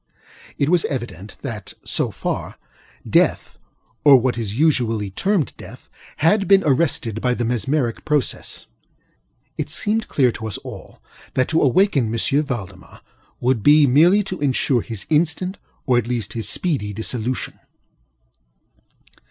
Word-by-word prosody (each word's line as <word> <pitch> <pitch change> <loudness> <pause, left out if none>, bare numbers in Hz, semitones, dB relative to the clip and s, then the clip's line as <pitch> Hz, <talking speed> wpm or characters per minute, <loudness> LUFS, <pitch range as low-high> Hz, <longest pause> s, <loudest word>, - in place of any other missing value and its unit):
It 140 - +1
was 175 -1 +3
evident 110 - -6
that, - - -7
so - - +1
far, - - -4 0.5
death - - +1 0.4
(or 140 -2 +8
what 125 +1 0
is 110 -2 -4
usually 115 -9 +1
termed 190 - 0
death) - - -12 0.3
had 195 +6 +2
been 195 -1 +5
arrested 130 -6 0
by 125 -1 +1
the 120 - -2
mesmeric 125 +1 -1
process. 150 -4 -2 0.9
It - - -2
seemed 220 +2 -1
clear 130 -4 +2
to 110 - -6
us 105 - -3
all - - -11 0.3
that 130 - +1
to 160 - +2
awaken 140 - +2
M. 115 - -2 0.3
Valdemar 120 -10 -7 0.4
would 125 -2 +1
be 150 +5 +6
merely 170 +10 +5
to 185 -2 -6
insure 135 -3 +1
his 110 -4 -7
instant, 170 +5 0 0.3
or 125 -2 +3
at 120 - -4
least 120 -4 -3
his 110 -3 -2
speedy, 135 - -1
dissolution. 115 +3 -3
130 Hz, 135 wpm, -21 LUFS, 115-160 Hz, 0.9 s, or